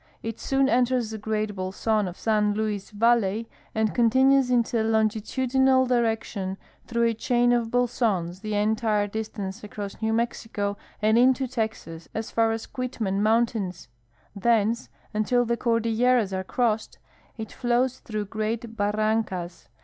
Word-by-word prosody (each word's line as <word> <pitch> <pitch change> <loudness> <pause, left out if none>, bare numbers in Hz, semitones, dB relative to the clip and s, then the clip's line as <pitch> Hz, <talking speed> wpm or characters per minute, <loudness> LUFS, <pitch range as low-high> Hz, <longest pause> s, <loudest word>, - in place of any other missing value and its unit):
It 225 0 -5
soon 270 0 +1
enters 245 -2 +1
the 220 - -5
great 215 -1 -2
bolson 195 +2 -1
of 180 - -7
San 210 -2 +1
Luis 210 -2 -2
valley 225 0 +2 0.3
and 220 -1 +1
continues 260 +2 +4
in 240 -2 +3
a 230 - +2
longitudinal 245 +4 +2
direction 225 -5 -1 0.3
through 235 -1 0
a 230 - +2
chain 245 +2 +2
of 235 -2 +1
bolsons 225 -8 0
the 215 +1 -3
entire 215 0 +1
distance 205 -1 -5
across 205 0 -7
New 220 0 +1
Mexico 225 -3 -2 0.3
and 220 +2 +4
into 260 +1 +4
Texas 220 -9 -4
as 220 0 -4
far 225 -1 +2
as 225 0 -3
Quitman 220 -6 -3
mountains. 215 - 0 0.5
Thence, 230 +2 +1 0.2
until 240 +3 +2
the 235 0 +1
Cordilleras 230 -2 +2
are 190 0 -2
crossed, 220 +1 -1 0.4
it 220 -2 -6
flows 250 +1 0
through 215 -3 -4
great 220 +2 -3
barrancas. 205 - -1
220 Hz, 140 wpm, -25 LUFS, 210-240 Hz, 0.5 s, continues